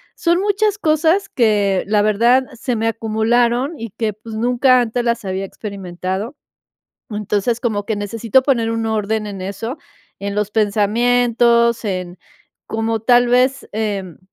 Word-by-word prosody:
son 345 +1 +1
muchas 410 +1 +1
cosas 320 +1 +2
que, 205 -5 +2
la 210 0 +2
verdad, 235 +5 +3 0.2
se 250 -1 -2
me 225 0 -1
acumularon 235 +6 0
y 230 -2 -6
que, 220 +1 -2
pues, 220 +2 -10
nunca 250 +2 +3
antes 240 +1 -1
las 235 -1 0
había 190 0 -3
experimentado. 195 - -5 0.8
Entonces, 210 +2 -1
como 215 -4 -2
que 220 - -1
necesito, 225 +4 +1
poner 235 -5 +1
un 225 0 -2
orden 215 0 -1
en 200 -2 -7
eso, 200 - -5 0.4
en 200 0 -3
los 210 0 -1
pensamientos, 235 +2 +2
en 185 -3 -4 0.5
como 225 0 -2
tal 245 +2 +4
vez, 255 +2 +2
em, 205 -5 -3
225 Hz, 140 wpm, -18 LUFS, 205-245 Hz, 0.8 s, tal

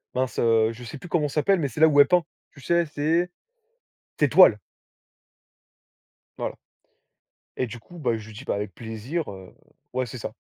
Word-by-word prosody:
mince, 130 0 -1
heu, 115 -1 +3
je 120 +2 -10
sais 120 - -7
plus 175 +5 -11
comment 155 -4 +1
ça 140 - -9
s'appelle, 195 +2 +3
mais 145 - 0
c'est 135 +4 -6
là 160 - +9
où 145 -1 +3
elle 145 - +8
peint. 180 -1 +3 0.3
Tu 140 - -15
sais, 170 +4 +2
ses 160 +3 0 0.9
ses - - +5
toiles - - +7 1.8
voilà - - -4 1.0
et 130 - 0
du 120 +1 -8
coup, 175 +10 -15
bah, 120 -7 0
je 110 -1 -9
lui 110 - -12
dis: 125 - -10
«Bah, - - 0
avec 100 -2 -4
plaisir, 115 - -5
heu». 95 -1 -12 0.4
Ouais 130 0 -1
c'est 120 +2 -8
ça. 110 - -6
130 Hz, 195 wpm, -25 LUFS, 115-160 Hz, 1.8 s, là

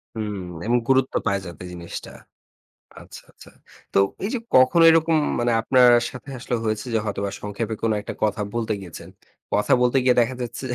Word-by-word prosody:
হুম। 105 -2 -4 0.3
এবং 120 - 0
গুরুত্ব 135 0 +2
পায় 100 0 +1
যাতে 85 0 -9
জিনিসটা। 85 -1 -8 0.9
আচ্ছা, - - -12
আচ্ছা। - - -16 0.4
তো - - +3 0.3
এই - - 0
যে - - 0 0.2
কখনো 130 +6 +5
এরকম 160 0 +3 0.2
মানে 120 0 +1
আপনার 125 +1 +5 0.2
সাথে 125 +2 -10
আসলে 120 0 -3
হয়েছে 110 +2 -2
যে 110 - +3
হয়তোবা 100 -1 -3
সংক্ষেপে 105 +2 -4
কোনো 115 -1 +1
একটা 105 - -7
কথা 105 0 0
বলতে 115 -2 -1
গিয়েছেন। 90 -4 -10 0.4
কথা 105 - +1
বলতে 125 +2 +2
গিয়ে 125 - +4
দেখা 125 +2 0
যাচ্ছে 120 - -6
যে - - -1
115 Hz, 180 wpm, -23 LUFS, 105-130 Hz, 0.9 s, কখনো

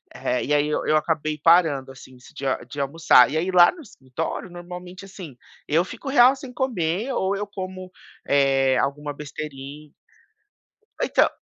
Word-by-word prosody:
Eh, 125 - -2
e 150 - 0
aí 145 0 +2
eu 155 0 0
acabei 155 -1 -1
parando 155 -5 +3
assim 130 -1 -14
de 125 +2 -10 0.2
de 145 - -7
almoçar. 140 -2 +4
E 155 - -3
aí 175 +4 -1
lá 175 -1 +7
no 355 - -13
escritório, 160 - -6
normalmente 180 +2 -9
assim, 185 -8 -11 0.3
eu 160 +4 +2
fico 230 +8 -8
real 260 0 +6
sem 265 -2 -10
comer 225 -3 -2
ou 195 -2 0
eu 205 +1 -4
como, 185 -2 -8 0.4
eh, 135 -2 +3
alguma 145 +3 -2
besteirinha. 145 0 -9 1.1
Então - - +3
160 Hz, 150 wpm, -23 LUFS, 140-185 Hz, 1.1 s, lá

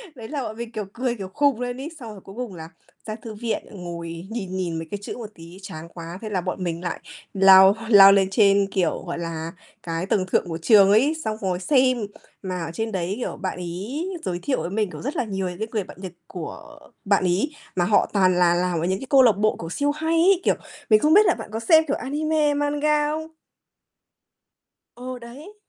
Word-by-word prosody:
Đấy 230 -4 -9
là 285 -1 -3
bọn 220 -1 -6
mình, 235 0 -6
kiểu, 210 -3 -4
cười, 245 0 -2
kiểu, 195 -4 -6
khùng 285 -5 +2
lên 245 0 -3
ấy. 305 - -5
Xong 230 -3 -8
rồi 200 -3 -11
cuối 195 - -13
cùng 240 -6 -5
là 160 -1 -9 0.4
ra 215 - -4
thư 220 0 -9
viện 225 +1 -3
ngồi 170 -2 -7
nhìn 195 -5 -5
nhìn 175 -3 -2
mấy 165 - -7
cái 205 - -2
chữ 205 - -6
một 225 -3 -7
tí 170 +3 -12
chán 160 -4 -8
quá. 170 +1 -8
Thế 220 - -5
là 190 -3 -1
bọn 185 +1 -4
mình 170 -1 -3
lại 175 - -3 0.3
lao 190 0 +7
lao 195 -3 +9
lên 195 -1 +3
trên, 200 -1 +4
kiểu, 180 -5 0
gọi 170 - -4
là, 165 -1 -4 0.3
cái 165 +1 -3
tầng 190 -1 0
thượng - - +2
của 165 - -3
trường 195 +3 +5
ấy, 250 +10 +4
xong 215 0 -2
ngồi 185 -3 -1
xem, 255 +2 +2 0.4
mà 180 -3 -4
ở 165 - -6
trên 225 +4 -3
đấy, 185 -1 -2
kiểu, - - -4
bạn 185 - -4
ấy 195 - -5 0.2
giới 175 -1 -2
thiệu 260 +8 -1
với - - -4
mình 210 +1 -1
cũng - - -8
rất 275 +4 -4
là - - 0
nhiều 195 -4 -3
những 180 - -9
cái 220 - -2
người 215 -3 -1
bạn - - -13
Nhật 185 -2 -6 0.2
của 200 - -9 0.3
bạn 200 -1 +2
ấy, 185 - +1 0.2
mà 175 - +2
họ 205 +2 +3
toàn 185 -2 +3
là 175 -1 +4
làm 175 -1 0
ở 165 - -1
những 190 +2 0
cái 265 - -8
câu 275 -2 +6
lạc 230 -6 +5
bộ, 215 +1 +1
kiểu, 165 - -6
siêu 285 - 0
hay 320 +2 -2
ấy, 360 +2 +4
kiểu, - - +3 0.3
mình 215 -1 +6
không 300 +7 +3
biết 420 +2 +7
là - - +4
bạn 225 - -9
có 225 - -2
xem, 315 +8 +5
kiểu, 280 - 0
anime, 300 +1 0
manga 295 +1 +1
không? 315 +1 -4 1.7
Ờ, 255 +1 -7
đấy. 280 - -12
205 Hz, 235 wpm, -23 LUFS, 180-255 Hz, 1.7 s, lao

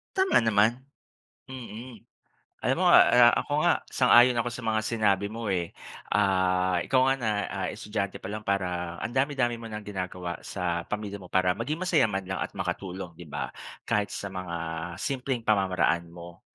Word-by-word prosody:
Tama 380 0 +3
naman, 110 +2 +3 0.7
mm. 120 -3 -9 0.6
Alam - - +1
mo - - +2
nga - - +8
a - - +5 0.3
ako 145 - -4
nga 175 - +4 0.2
sang-ayon 125 -1 +6
ako 120 - -3
sa 120 -1 -7
mga 110 -1 +1
sinabi 105 -3 +1
mo 115 +1 -6
eh, 85 -2 -1 0.4
ah, 95 -3 +2
ikaw 130 -1 +2
nga 135 - +4
na, 110 - 0 0.2
ah, - - -3
estudyante 105 -2 -4
pa - - -14
lang 105 +2 -4
parang 90 -4 -2
ang 120 - -5
dami-dami 130 -4 0
mo 115 - -8
ng 105 -1 -7
ginagawa 90 -3 -5
sa 85 -2 -2
pamilya 100 -2 -4
mo 90 - -12
para 90 -1 +2
maging 130 - -3
masaya 175 -10 +2
man 95 -1 -3
lang 95 0 -4
at - - -5
makatulong, 90 -2 -4
'di 85 -2 -12
ba? 70 -4 -4 0.3
Kahit 105 -1 0
sa 100 -1 -6
mga 90 -2 -5 0.4
simpleng 125 0 -3
pamamaraan 90 -5 +1
mo. 85 0 -12
100 Hz, 175 wpm, -27 LUFS, 90-120 Hz, 0.7 s, nga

